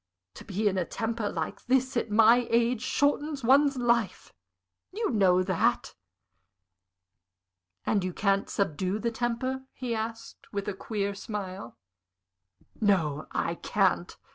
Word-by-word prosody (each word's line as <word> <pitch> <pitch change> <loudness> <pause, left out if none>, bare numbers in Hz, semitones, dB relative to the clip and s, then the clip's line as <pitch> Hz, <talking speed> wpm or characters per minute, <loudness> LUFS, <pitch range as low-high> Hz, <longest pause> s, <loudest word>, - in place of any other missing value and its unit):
To - - -11
be 205 +2 -1
in 190 -2 +1
a - - +1
temper 225 +3 -3
like 160 -2 -5
this, 260 +1 +1
at 235 - 0
my 225 +3 +5
age, 235 0 +2
shortens 285 +1 0
one's 275 +3 +4
life 235 -4 0 0.6
you 435 - -1
know 185 -5 +4
that." 185 -2 0 1.9
"And 200 -3 +1
you 185 - -2
can't 195 +2 0
subdue 190 +1 -1
the 230 +2 -1
temper?" 245 +3 -2
he 250 -3 -4
asked, 225 +1 -6
with 200 -1 -4
a 205 - -1
queer 200 0 -3
smile. 195 - -6 1.0
"No, 165 -9 +1
I - - -1
can't! - - 0
220 Hz, 130 wpm, -28 LUFS, 195-245 Hz, 1.9 s, my